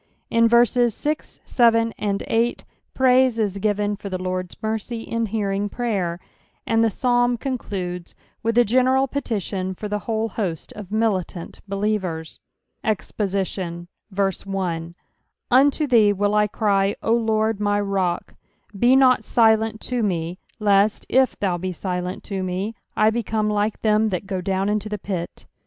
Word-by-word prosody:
In 230 0 +5
verses 235 0 +4
6, 300 +1 -4
7, 230 -2 +3
ond 200 -1 -1
8, 230 +1 0 0.3
praise 255 -2 +4
Is 205 -3 -1
given 205 0 0
for 200 0 -7
Oie 185 - -2
Zorrfs 185 0 -4
mercy 220 +1 -3
in 230 -1 -2
hearing 205 -1 -1
prayer, 195 -8 -2 0.5
and 225 0 +2
the - - +4
Psabn 245 +2 +1
amdudes 190 -9 -4 0.3
with 230 +1 0
a 240 - +6
gena 255 +4 +3
al 265 +1 +3
petition 200 -8 -3
for 210 - -5
the 210 0 -2
whole 225 0 0
host 185 -7 -4
cf 210 -2 -8
miiUant 200 -5 -2
btlitKera. 195 -6 -2 0.4
EXPOSITION. 190 -4 -2 1.6
UNTO 280 +4 +4
thee 225 -6 +5
will 205 +1 0
I 210 0 +3
cry, 200 -2 +1
O 225 - +2
Lord 220 -2 +1
my 205 0 +1
rock; 195 -3 -1 0.4
be 240 +6 +4
not 260 -2 +5
silent 220 -2 +3
to 250 -1 -2
me, 175 -3 -2 0.2
lest, 205 0 +3
i/thou 205 -8 +2
be 185 +1 -3
silent 180 0 -4
to 195 -2 -4
me, 185 +4 -2 0.2
I 215 +1 +4
become 220 -2 -1
like 210 +1 0
them 215 0 +3
that 185 0 -3
go 190 -2 -3
down 190 +1 -1
into 210 +1 -1
the 210 - -3
pit. 185 -4 -5
210 Hz, 145 wpm, -22 LUFS, 195-230 Hz, 1.6 s, a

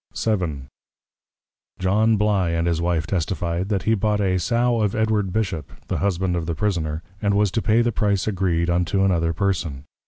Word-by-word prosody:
VII. 90 -11 -1 1.1
John 105 +4 +2
Bly 100 -4 +2
and 85 0 0
his 85 -1 0
Wife 85 -2 0
testifi'd, 85 +1 -2
That 100 -3 0
he 110 - +2
bought 105 0 +1
a 95 -2 +1
Sow 120 +4 +1
of 105 -2 0
Edward 110 -3 +1
Bishop, 95 -8 -2 0.2
the - - -1
Husband 95 -2 0
of 85 -2 -3
the 85 - -1
Prisoner; 80 -3 -1 0.2
and 100 -1 +1
was 105 -2 +2
to 115 - 0
pay 110 +2 +3
the 120 - +1
Price 100 -3 0
agreed, 90 -5 0
unto 90 +3 +1
another 85 -4 +2
person. 85 -6 -2
95 Hz, 180 wpm, -22 LUFS, 85-105 Hz, 1.1 s, pay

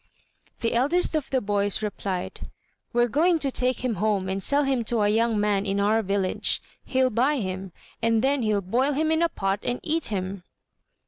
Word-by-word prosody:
The 230 - 0
eldest 290 +11 +2
of 305 -3 -1
the 260 -2 +1
boys 205 0 0
replied, 195 -3 -4 0.4
"We're 240 0 +3
going 330 +8 +3
to 280 -4 0
take 255 0 0
him 230 -5 -1
home 205 -3 +1
and 195 +1 -2
sell 285 +7 +2
him 265 -3 0
to 230 0 +1
a 205 - +3
young 225 0 +2
man 205 -1 +1
in 200 0 -1
our 215 +3 +3
village. 195 -2 0 0.2
He'll 260 -1 +1
buy 255 +7 +2
him, 190 -4 -4 0.3
and 230 0 +2
then 275 0 +2
he'll 215 -3 +1
boil 250 +10 +1
him 310 +3 +1
in 320 +1 +2
a 335 - +3
pot 195 -4 -2
and 245 0 -1
eat 320 0 -1
him." 190 -2 -4
230 Hz, 195 wpm, -25 LUFS, 200-265 Hz, 0.4 s, We're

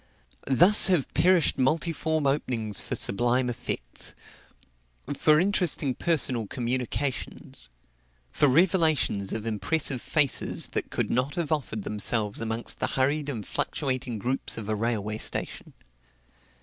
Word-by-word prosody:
Thus 175 +12 +6
have 180 -8 +1
perished 175 0 +3
multiform 160 +2 0
openings 120 -7 -1
for - - -4
sublime 120 +5 +1
effects, 90 - -5 1.0
for 150 +2 +4
interesting 175 -7 +1
personal 130 -7 +1
communications, 125 - -4 0.6
for 145 - +3
revelations 155 - +2
of 110 0 -4
impressive 120 +5 0
faces 150 -4 +1
that - - -3
could - - -2
not 130 +5 0
have 170 -4 -3
offered 120 -9 -2
themselves 105 +1 -1
amongst 115 +1 -3
the - - 0
hurried 145 +2 0
and 110 -7 -5
fluctuating 130 -4 -2
groups 125 +6 -3
of 110 -3 -6
a - - +1
railway 110 -1 -2
station. - - -5
130 Hz, 120 wpm, -26 LUFS, 115-155 Hz, 1.0 s, Thus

